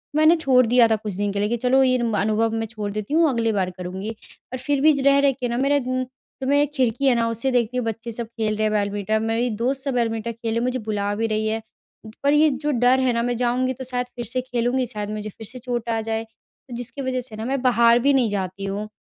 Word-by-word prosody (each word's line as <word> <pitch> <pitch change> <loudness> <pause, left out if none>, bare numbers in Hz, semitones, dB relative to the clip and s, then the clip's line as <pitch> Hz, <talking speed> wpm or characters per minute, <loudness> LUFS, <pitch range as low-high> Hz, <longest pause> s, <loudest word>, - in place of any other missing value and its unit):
मैंने 310 +2 +6
छोड़ 265 -6 +3
दिया 240 0 +5
था 225 - +2
कुछ 215 -1 -5
दिन 205 +2 -1
के 200 - -2
लिए 205 +1 0
कि 240 - 0
चलो 255 +3 +3
ये 255 -1 +3
म 230 -2 -1
अनुभव 215 +2 +1
मैं 225 0 -1
छोड़ 210 -2 -5
देती 215 +6 -4
हूँ 325 0 +4
अगली 230 -3 0
बार 190 -3 0
करूँगी। 185 +3 -5 0.4
और - - -2
फिर 275 +2 0
भी 310 +1 +6
ज 280 - -2
रह-रह 280 0 +5
के 255 -1 -4
न 240 0 -2
मेरा 285 +1 +3
उम, 255 0 0 0.4
तो 260 - -2
मैं 285 +1 +4
एक 290 0 0
खिड़की 255 0 +1
है 260 -2 +5
न 235 - +1
उससे 230 +4 -1
देखती 245 0 0
हूँ 250 - -1
बच्चे 225 +1 -4
सब 230 0 -3
खेल 220 -2 -2
रहे 215 - 0
हैं 215 - +1
बैडमिंटन, 205 +1 0
मेरी 225 +2 0
दोस्त 260 +5 -1
सब 275 -2 -2
बैडमिंटन 230 -2 -1
खेल 230 0 -8
रही - - -2
है 230 - +1
मुझे 255 +1 -1
बुला 205 -2 -2
भी 225 +2 0
रही 215 0 -1
है। 220 +1 -1 0.6
पर 285 +1 +4
ये 305 +1 +5
जो 295 +2 -2
डर 250 0 +3
है 260 -2 +2
ना 235 - 0
मैं 245 0 -1
जाऊँगी 250 +2 0
तो 260 - -8
शायद 250 -1 -2
फिर 240 - -5
से 255 +3 -2
खेलूँगी 250 0 -1
शायद 210 -4 -5
मुझे 215 0 -4
फिर 215 +1 -11
से 250 +4 -9
चोट 240 -2 -4
आ 225 -1 0
जाए 225 0 -2
तो 225 +2 -15
जिसकी 245 +4 -4
वजह 260 -1 -1
से 240 -3 -6
न 220 +2 -5
मैं 270 0 -1
बाहर 235 -2 +4
भी 280 +3 +3
नहीं 255 -4 +3
जाती 195 -1 -3
हूँ। 200 +2 -3
235 Hz, 275 wpm, -23 LUFS, 220-255 Hz, 0.6 s, मैंने